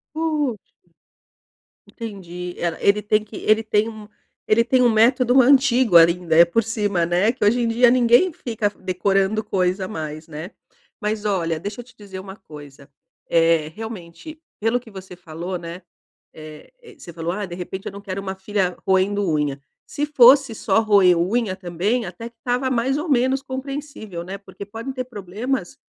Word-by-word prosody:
Puxa. 305 -7 -1 1.3
Entendi, 180 -6 -8
ela 170 -2 -2
ele 205 +1 +3
tem 215 +1 +1
que 215 0 -11
ele 215 +1 +2
tem 215 0 +1
um 215 -2 -11 0.4
ele 225 +2 +4
tem 255 +2 +2
um 245 - +5
método 245 +3 +4
antigo 255 -6 +5
ali, 165 +1 +7
né, 170 -1 +4
por 225 +7 0
cima, 205 -6 -1
né, 180 +7 +2
que 245 - -4
hoje 225 +4 +3
em 235 - +1
dia 235 +2 +4
ninguém 250 +8 +4
fica 225 -7 -2
decorando 195 +2 0
coisa 185 -1 -1
mais, 155 -3 -6
né? 160 +4 -8 0.5
Mas 210 0 -2
olha, 170 -6 0
deixa 205 +6 -6
eu - - -13
te 235 -1 -21
dizer 195 -3 -9
uma 190 +1 -9
coisa. 145 -4 -14 0.4
Eh, 165 -2 +3
realmente, 220 - -9 0.2
pelo 225 +3 +1
que 240 -2 -16
você 190 -2 -10
falou, 175 +2 -6
né, 170 +2 -8 0.5
eh 155 - -12
eh, 465 - -15
você 170 - -11
falou: 165 +1 -3
"Ah, 205 0 -4
de 175 - -8
repente, 185 +2 -7
eu - - -4
não 200 - -9
quero 195 -1 -5
uma 190 -1 -5
filha 190 -2 -2
roendo 195 +2 +2
unha." 145 -2 -1 0.3
Se 290 - -3
fosse 275 -3 +5
só 215 0 +1
roer 200 -4 +5
unha 190 +2 0
também, 190 +7 -1
até 190 +5 -7
que 235 - -29
estava 250 +1 -1
mais 260 +3 0
ou 320 +2 -4
menos 265 0 +2
compreensível, 265 - -6
né? 190 +3 -6
Porque 200 0 -11
podem 225 +6 -6
ter 255 -1 -4
problemas 210 0 -4
205 Hz, 175 wpm, -21 LUFS, 180-240 Hz, 1.3 s, ali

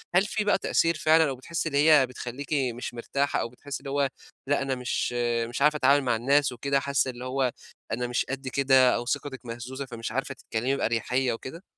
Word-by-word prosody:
هل 190 - +5
في 215 0 -1
بقى 205 - +3
تأثير 165 -3 +1
فعلًا 155 0 +4
أو 135 - -3
بتحسّي 165 +5 -3
اللي 145 +2 +3
هي 145 -4 +6
بتخلّيكِ 125 +4 -6 0.2
مش 120 0 -6
مرتاحة 140 +4 -1
أو 115 - -3
بتحسّي 140 +3 -7
اللي 140 - -8
هو 140 -1 +1 0.4
لأ 145 0 +2
أنا 135 -1 -1
مش 125 -1 -2 0.3
مش 120 +4 -5
عارفة 150 +1 +4
أتعامل 140 +1 +4
مع 120 -3 +1
الناس 135 +4 +2
وكده 140 +3 0
حاسّة 140 -1 0
اللي 125 +1 -9
هو 130 0 0 0.4
أنا 125 +2 -1
مش 120 0 0
قد 135 0 -4
كده 130 0 +4
أو 120 - -3
ثقتِك 135 -1 -3
مهزوزة 120 +4 -6
فمش 115 -3 -6
عارفة 135 +3 -3
تتكلمي 125 +4 -2
بأريَحيّة 125 +1 0
وكده؟ 145 +9 -8
135 Hz, 205 wpm, -27 LUFS, 125-145 Hz, 0.4 s, هي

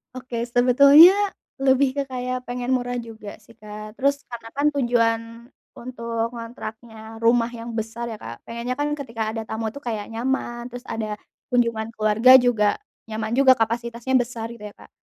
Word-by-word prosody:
Oke, 240 -2 -4
sebetulnya 275 +7 +7 0.5
lebih 265 0 +3
ke - - +2
kayak 255 -1 -4
pengen 245 0 -4
murah 245 -1 0
juga 220 -3 -10
sih, 230 +2 -20
Kak, 215 +1 -10
terus 280 +1 +1
karena 230 -1 -8
kan 285 +2 -1
tujuan 235 -5 +1 0.5
untuk 230 -2 -4
ngontraknya 225 -1 -9
rumah 230 +1 +2
yang 235 -1 -8
besar 225 +1 -4
ya, - - -8
Kak, 115 +1 -9
pengennya 240 +3 -4
kan 295 0 -1
ketika 230 -6 -4
ada 225 - -3
tamu 220 0 -4
tuh 280 - -9
kayak 220 -5 -4
nyaman 240 0 -3
terus 245 0 -9
ada 215 -2 -4 0.3
kunjungan 230 -3 0
keluarga 220 +5 +6
juga, 230 -5 +2 0.3
nyaman 220 +1 -3
juga 260 0 +5
kapasitasnya 235 +2 -2
besar 235 -2 0
gitu 230 - -15
ya, - - -18
Kak, - - -16
235 Hz, 165 wpm, -23 LUFS, 225-250 Hz, 0.5 s, sebetulnya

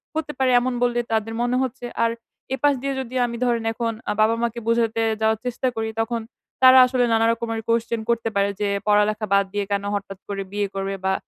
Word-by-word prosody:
হতে 315 -1 -2
পারে 260 -1 +2
এমন 255 +1 -1
বললে 240 0 +1
তাদের 225 0 0
মনে 245 +1 +1
হচ্ছে। 255 -1 -5 0.2
আর 230 - +1 0.4
এপাশ 290 +1 +3
দিয়ে 275 0 -2
যদি 255 0 -8
আমি 235 -1 -4
ধরেন 235 -2 +1
এখন 230 0 -2 0.2
আ - - +2
বাবা-মাকে 230 +1 +1
বোঝাতে 230 -1 +1 0.2
যাওয়ার 220 0 +2
চেষ্টা 250 +1 -1
করি 220 0 -2
তখন, 230 +1 -2 0.4
তারা 260 0 +9
আসলে 250 -1 +1
নানা 225 0 +3
রকমের 230 -1 -3
question 230 0 +1
করতে 230 -1 +1
পারে। 200 0 +2
যে 205 - 0 0.2
পড়ালেখা 210 +1 +2
বাদ 200 0 +4
দিয়ে 205 -1 -1
কেন 200 0 0
হঠাৎ 195 -1 -5
করে 200 -1 -3
বিয়ে 205 0 -1
করবে? 195 0 -2
বা 190 - +2
230 Hz, 200 wpm, -23 LUFS, 210-245 Hz, 0.4 s, তারা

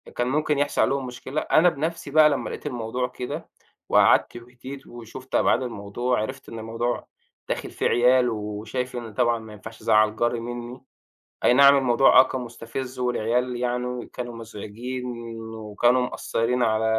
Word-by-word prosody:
كان 120 - 0
ممكن 150 +2 +1
يحصل 145 +1 +1
عليهم 135 -1 +1
مشكلة، 125 +4 -4
أنا 170 +3 +4
بنَفْسي 160 -1 -4
بقى 155 0 +7
لمّا 140 - -2
لقيت - - -8
الموضوع 125 -1 -2
كده، 125 0 -6 0.4
وقعدت - - +4
وهديت 125 +3 -10
وشُفت 120 +2 -9
أبعاد - - +3
الموضوع، 120 +1 -2
عرِفت 130 +4 -6
إن 115 - -7
الموضوع 115 +2 -3 0.4
داخل - - -3
فيه - - 0
عيال، 125 +1 +4
وشايف 110 +4 -4
إن 115 -3 -6
طبعًا 115 +2 +2
ما 110 -1 -11
ينفعش 110 +2 -11
أزعّل 110 0 +3
جَاري 120 +1 0
منّي، 120 +1 -7 0.6
أينعم 140 +3 +7
الموضوع 130 0 +6
آه - - +10
كان 130 - -4
مُستفز 125 +2 -7
والعيال 125 0 0
يعني 125 0 -2
كانوا 120 -2 -7
مزعجين 115 +3 -7 0.5
وكانوا 110 +4 +1
مأثرين 125 +2 -1
على 110 -1 +2
120 Hz, 150 wpm, -24 LUFS, 115-130 Hz, 0.6 s, آه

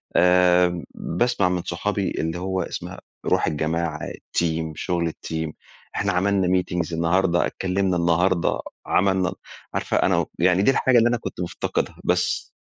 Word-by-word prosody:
آآ 90 -1 +4
باسمع 100 0 0
من 90 -1 -1
صحابي 100 +2 -2
اللي 80 +2 -2
هو 95 +1 -2
اسمها - - -6 0.3
روح - - +2
الجماعة، 80 +1 -1
الteam، 80 -2 -2
شغل 85 -1 -1
الteam، 80 0 -4 0.4
إحنا 100 0 +1
عملنا 95 +1 +2
meetings 85 -2 -3
النهارده، 85 +2 +2
اتكلمنا 95 -1 0
النهارده، 85 +1 +2 0.3
عملنا 95 -1 +2 0.4
عارفة - - 0
أنا - - +3
و - - +1
يعني 90 +2 +4
دي 135 - +5
الحاجة 130 -2 +3
اللي 120 0 +5
أنا 120 - +1
كنت - - -7
مفتقدها، 90 - -2
بس. - - 0
90 Hz, 145 wpm, -23 LUFS, 85-95 Hz, 0.4 s, دي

